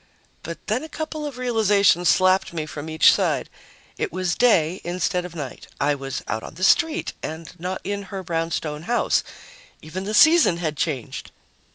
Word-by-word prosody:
But 170 0 -6
then 220 +4 0
a 320 - -8
couple 310 -1 -4
of 275 -4 -8
realizations 205 -7 +3
slapped 185 0 +3
me 160 -2 -3
from 155 0 -7
each 160 0 +6
side. - - 0 0.5
It - - -1
was 185 -1 -1
day 180 -6 +3
instead 180 +1 -1
of 175 -1 -9
night. 140 -6 -7
I 145 +1 +2
was 135 -1 -5
out 110 - -2
on - - -10
the 185 - -6
street 320 - +3
and 160 +1 -6
not 180 +2 -4
in 200 +1 -3
her 195 -1 -5
brownstone 165 -1 -3
house. 240 - +2 0.6
Even 185 +5 -6
the 215 +2 -2
season 315 - +6
had 160 -3 -2
changed! 140 -3 -3
180 Hz, 175 wpm, -23 LUFS, 155-205 Hz, 0.6 s, each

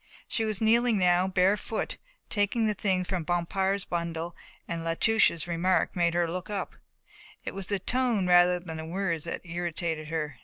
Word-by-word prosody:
She 225 - -1
was 215 -2 -3
kneeling 230 +1 +4
now, 180 0 +3
bare 190 +1 +3
footed, 220 +1 -4 0.3
taking 210 +2 +1
the 215 - +2
things 185 -3 0
from 185 -3 -2
Bompard's 190 +3 0
bundle 170 0 -3 0.3
and 165 -1 -4
La 165 0 -1
Touche's 195 -6 +3
remark 175 +2 +1
made 170 -1 +1
her 175 -1 +2
look 180 +4 -5
up. 205 -2 -3 0.7
It - - -4
was 195 -2 -4
the 200 - +1
tone 235 0 +1
rather 180 0 +5
than 165 -2 -7
the 160 - -6
words 170 -2 -2
that - - -4
irritated 170 -2 -3
her. 155 -4 -3
180 Hz, 180 wpm, -28 LUFS, 170-200 Hz, 0.7 s, rather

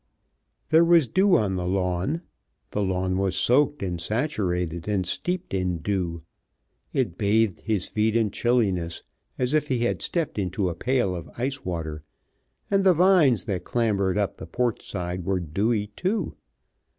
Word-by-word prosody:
There 160 +1 +7
was 170 -5 +5
dew 190 - +4
on 100 -3 0
the 90 -1 -2
lawn. 95 - -1 0.5
The 105 - -1
lawn 95 -1 0
was 95 -1 0
soaked 145 +1 +2
and 90 -3 -3
saturated 90 - -1
and 100 -3 0
steeped 180 - -2
in 90 -2 0
dew. 85 -2 -2 0.7
It 115 -11 -1
bathed 105 -1 +2
his 105 -5 -1
feet 110 +1 0
in 110 -3 +2
chilliness, 95 -9 0 0.3
as 125 +2 0
if 155 -1 +2
he 125 -4 0
had - - -1
stepped 165 -10 -1
into 95 0 -1
a - - -3
pail 120 -3 0
of 85 -2 -7
ice 130 +3 -2
water, 80 -4 -4 0.7
and 195 -1 +3
the 185 -2 +5
vines 170 - +4
that 95 -5 -2
clambered 100 -5 0
up 100 -2 -1
the - - -8
porch 120 -3 -2
side 90 -1 -4
were 95 +1 0
dewy 105 +7 0
too. 195 +5 -1
105 Hz, 160 wpm, -25 LUFS, 90-130 Hz, 0.7 s, There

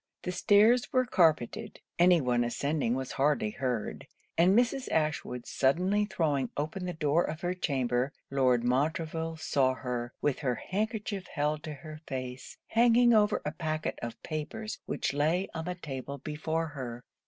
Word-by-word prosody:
The 180 - -2
stairs 210 +6 +4
were 255 -1 +3
carpetted; 160 - +1 0.2
any 175 -1 +6
one 120 -2 +2
ascending 135 +1 0
was 130 0 -4
hardly 135 -6 +1
heard; 125 -2 -3 0.3
and 185 +5 +5
Mrs. 250 +2 +1
Ashwood 155 -6 -1
suddenly 185 +10 +2
throwing 145 - 0
open 155 +6 -3
the 180 - -2
door 160 +1 +2
of 155 +2 -4
her 175 0 0
chamber, 130 -6 0 0.2
Lord 130 -3 +3
Montreville 160 +5 0
saw 130 -4 +1
her, 125 -2 -4
with 145 -3 0
her 125 -5 0
handkerchief 205 - -3
held 150 -1 -1
to 155 -2 -5
her 155 +2 -10
face, 130 -1 -6
hanging 240 +1 +5
over 210 -1 +3
a 150 - -1
packet 155 -1 -3
of 115 -1 -5
papers 170 +8 -5
which - - -1
lay 160 +6 +1
on 160 -1 -4
the 180 0 -3
table 140 -4 -6
before 155 +3 -2
her. 125 -4 -6
155 Hz, 155 wpm, -30 LUFS, 130-180 Hz, 0.3 s, any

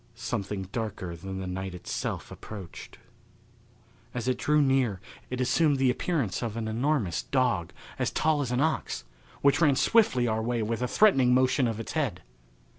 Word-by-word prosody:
Something 105 -4 -3
darker 105 -7 -4
than 95 +3 -6
the 95 - -4
night 95 0 -4
itself 90 - -4
approached. 100 -6 -9 1.2
As 120 -1 -3
it 130 -1 0
drew 150 0 +3
near 135 -8 +2 0.3
it 125 - -4
assumed 145 +3 +3
the 130 -1 +3
appearance 140 - -1
of 115 -2 -3
an 110 -1 -2
enormous 115 - 0
dog, 125 -11 0 0.3
as - - +1
tall 155 -1 +1
as 130 -4 -2
an 125 +2 +1
ox, 160 +1 -1 0.4
which 140 +3 +4
ran 145 -4 +5
swiftly 130 - +3
our 110 0 0
way 120 0 -1
with 115 +2 -2
a 125 - +1
threatening 130 - +4
motion 130 0 +3
of 115 -1 -3
its 115 - -5
head. - - -2
125 Hz, 170 wpm, -28 LUFS, 105-135 Hz, 1.2 s, ran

